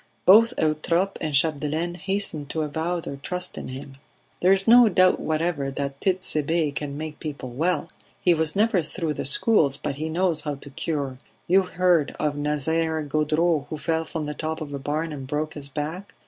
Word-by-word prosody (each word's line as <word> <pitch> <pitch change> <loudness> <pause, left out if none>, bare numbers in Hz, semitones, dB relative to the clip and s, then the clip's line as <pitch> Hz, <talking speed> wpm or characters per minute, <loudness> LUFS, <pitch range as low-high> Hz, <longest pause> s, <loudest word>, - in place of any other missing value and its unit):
Both 230 +6 +7
Eutrope 165 +5 +1
and 155 - -2
Chapdelaine 155 +3 +1
hastened 190 -6 -3
to 160 0 -1
avow 160 +4 -2
their 140 - -6
trust 180 +6 -5
in - - -6
him. 135 +1 -8 0.4
"There 185 - +4
is 195 +1 +3
no 240 0 +8
doubt 185 -1 +4
whatever 155 -3 -1
that 140 0 -4
Tit'Sebe 165 -5 +1
can 145 0 -4
make 155 0 -6
people 145 -4 -6
well. 160 +5 0 0.3
He 175 - +4
was 160 -2 0
never 210 -2 +3
through 160 0 -3
the - - -4
schools, 215 - +3
but 140 -1 -4
he 155 +2 -3
knows 170 -1 +1
how 150 -2 -3
to 140 0 -11
cure. 140 -3 -3 0.3
You 190 +3 +5
heard 180 -4 +1
of 150 -1 0
Nazaire 155 +2 0
Gaudreau 155 +1 +1
who 155 - -4
fell 160 +1 -1
from 160 -1 -5
the 150 - -4
top 155 +1 -4
of 145 -2 -6
a 140 - -3
barn 155 +3 -2
and 135 -3 -7
broke 150 +2 -2
his 140 -2 -8
back. 160 +7 -5
155 Hz, 190 wpm, -24 LUFS, 145-175 Hz, 0.4 s, no